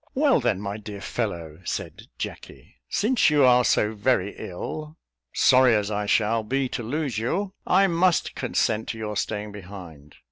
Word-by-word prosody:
"Well 280 0 +4
then, 95 - 0
my 100 0 -4
dear 105 -1 -8
fellow," 85 -9 -4
said - - -5
Jacky, - - -8
"since 235 0 +3
you 150 -2 +4
are 125 0 +6
so 105 -2 +2
very 105 -2 0
ill 155 - -7 0.3
sorry 125 -2 +5
as 105 0 0
I 105 0 -2
shall 110 +2 +2
be 135 +5 -1
to - - -4
lose 130 -1 -2
you 185 - -2
I 195 +2 +5
must 175 -1 +2
consent 110 0 -1
to 115 - -4
your 105 -1 -4
staying 105 0 -3
behind. 90 -7 -11
110 Hz, 165 wpm, -25 LUFS, 100-145 Hz, 0.3 s, are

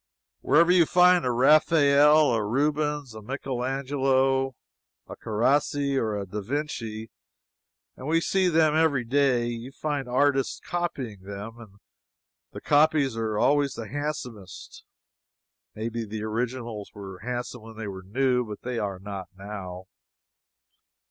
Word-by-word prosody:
Wherever 170 +1 +4
you 175 -3 +5
find 180 -2 +5
a 125 - +1
Raphael, 150 +2 +5
a 110 -2 0
Rubens, 145 +3 -1
a 110 - -9
Michelangelo, 135 +1 0 0.5
a - - -9
Carracci, 140 +5 0
or 110 -5 0
a 100 - -4
da 105 +3 -5
Vinci 115 -3 -4 0.8
(and 130 - -8
we 165 +1 +3
see 190 +2 +1
them 160 -3 +3
every 155 -5 +2
day,) 125 -1 +2
you 120 +2 -5
find 145 -2 -3
artists 135 +1 +1
copying 135 - -4
them, 100 +4 -8
and 105 -4 -14 0.8
the - - -9
copies 145 -3 +3
are 110 -2 -2
always 140 +3 +2
the 115 - -6
handsomest. 125 -10 -6 0.9
Maybe 115 +1 -3
the 110 0 -6
originals 115 -1 -4
were 95 -2 -9
handsome 125 +1 -5
when 110 0 -12
they 110 -2 -5
were 95 -1 -7
new, 125 +6 +1
but 105 -3 -9
they 125 -1 -3
are 100 -3 -3
not 95 -1 -7
now. 95 -2 -7
125 Hz, 135 wpm, -26 LUFS, 110-145 Hz, 0.9 s, you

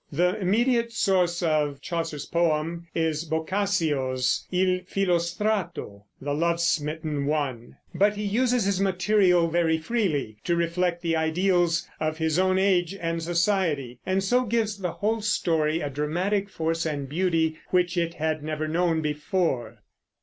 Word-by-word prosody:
The 180 +5 +2
immediate 235 +5 +2
source 180 -5 +1
of 150 -4 +1
Chaucer's 165 -4 -4
poem 170 0 0
is 160 -1 0
Boccaccio's 160 -6 0
Il 185 0 +2
Filostrato, 180 - -1
"the 145 +1 -3
love 170 +3 +1
smitten 155 -3 -1
one"; 140 -6 -2 0.2
but 205 +1 +3
he 210 - -4
uses 240 +2 +1
his 195 -1 +1
material 185 -2 +3
very 165 -1 +2
freely, 160 - -1
to 170 - +1
reflect 170 +1 0
the 165 -1 +1
ideals 170 +1 +1
of 155 0 -1
his 160 +1 +1
own 185 0 +3
age 190 -1 +2
and 165 0 -2
society, 170 - 0
and 190 +1 0
so 250 +6 +2
gives 220 -2 0
to - - -16
the 180 -3 -2
whole 220 +2 -1
story 165 -6 +1
a 145 - -2
dramatic 180 +8 -1
force 165 -2 -1
and 145 -4 -3
beauty 160 0 0
which 180 -1 +1
it 170 -1 -1
had 155 0 -1
never 155 0 -3
known 165 0 +1
before. 150 - -2
170 Hz, 145 wpm, -26 LUFS, 155-190 Hz, 0.2 s, but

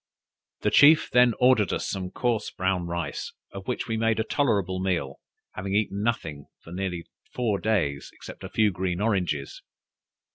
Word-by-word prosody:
The - - +1
chief 155 +3 +6
then 125 -2 +5
ordered 125 -7 +4
us - - -2
some 95 -2 -3
coarse 120 +2 -1
brown 90 -1 -1
rice, 85 0 -4 0.2
of 100 -1 -9
which 125 - -2
we 115 -1 -1
made 115 0 +1
a - - +2
tolerable 100 - 0
meal, 85 -8 -2 0.3
having 95 +1 -3
eaten 100 -1 0
nothing 80 -11 -2 0.2
for 80 - -12
nearly 90 -2 -3 0.3
four 110 -5 0
days, 85 -11 -1
except - - -12
a - - -6
few 110 -2 +2
green 90 -1 -2
oranges. 90 -10 -1
100 Hz, 160 wpm, -26 LUFS, 90-115 Hz, 0.3 s, chief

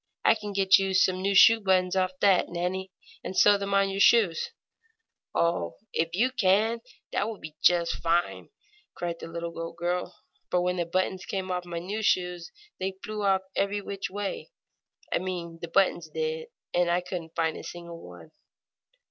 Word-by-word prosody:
"I - - +7
can 210 -2 -6
get 195 -1 +5
you 195 -1 -1
some 185 0 +3
new 200 +1 0
shoe 225 +4 +8
buttons 185 -2 +2
off 185 -1 +1
that, 195 -3 +4
Nannie, 185 +2 -3 0.3
and 190 - -5
sew 205 - +7
them 200 0 -1
on 195 0 +3
your 195 - -3
shoes." 200 -6 +4 0.9
"Oh, 130 - 0 0.2
if 165 +1 -1
you 245 +7 +2
can, 220 0 +2 0.3
that - - 0
will 220 - -6
be 155 -3 -10
just 170 -1 +3
fine!" 170 +1 0 0.5
cried 170 -1 -3
the - - -7
little 170 0 -5
goat 165 0 -6
girl. 175 +1 -2 0.3
"For 180 - +2
when 180 +1 0
the 170 -1 -1
buttons 185 +1 -1
came 190 -1 -3
off 180 0 -2
my 175 -1 -5
new 195 +6 -4
shoes 180 -4 0 0.3
they 190 0 -3
flew 210 -2 -2 0.3
every 200 +1 0
which 200 -1 -5
way 205 - -4 0.6
I - - +2
mean 175 -3 -5
the 170 - -4
buttons 175 -2 +1
did 160 0 -3 0.3
and 175 0 +2
I 175 +1 +2
couldn't 175 -2 -7
find 160 -1 0
a - - -8
single 170 -1 -9
one." 90 - -13
180 Hz, 180 wpm, -27 LUFS, 170-195 Hz, 0.9 s, shoe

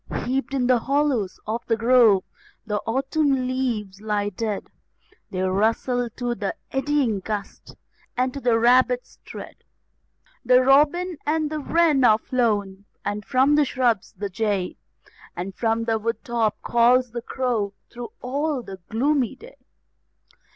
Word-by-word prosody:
Heaped 270 +2 -1
in 255 -2 +1
the 250 -1 +4
hollows 270 -7 0
of 225 +2 -3
the 225 - +1
grove, 230 -4 +5 0.4
the 210 -2 -1
autumn 270 +2 +1
leaves 225 -7 -2
lie 210 -1 -1
dead; 210 0 -3 0.6
They 185 0 -2
rustle 225 +6 +1
to 245 -1 -2
the 210 -4 -3 0.2
eddying 270 -6 +1
gust, 205 +1 -6 0.4
and 255 0 +1
to 280 - -5
the 240 -3 +2
rabbit's 250 +1 +2
tread. - - -9 0.9
The 250 +1 +5
robin 300 +6 +3
and 305 0 0
the 310 - -2
wren 310 -2 +2
are 215 -3 +6
flown, 205 -5 -1 0.2
and 205 +1 -2
from 260 +6 +3
the 300 0 +5
shrubs, 245 -6 0
the 200 +1 -4
jay, 200 -2 -1 0.6
And 185 +2 -5
from 225 +2 0
the 225 -1 0
wood 230 0 -3
top 230 -3 0
calls 240 +1 +3
the 235 0 -4
crow 230 -5 -2 0.2
through 240 0 -7
all 280 +1 -1
the 195 -3 -8
gloomy 260 +1 +1
day. - - -15
240 Hz, 145 wpm, -23 LUFS, 215-265 Hz, 0.9 s, are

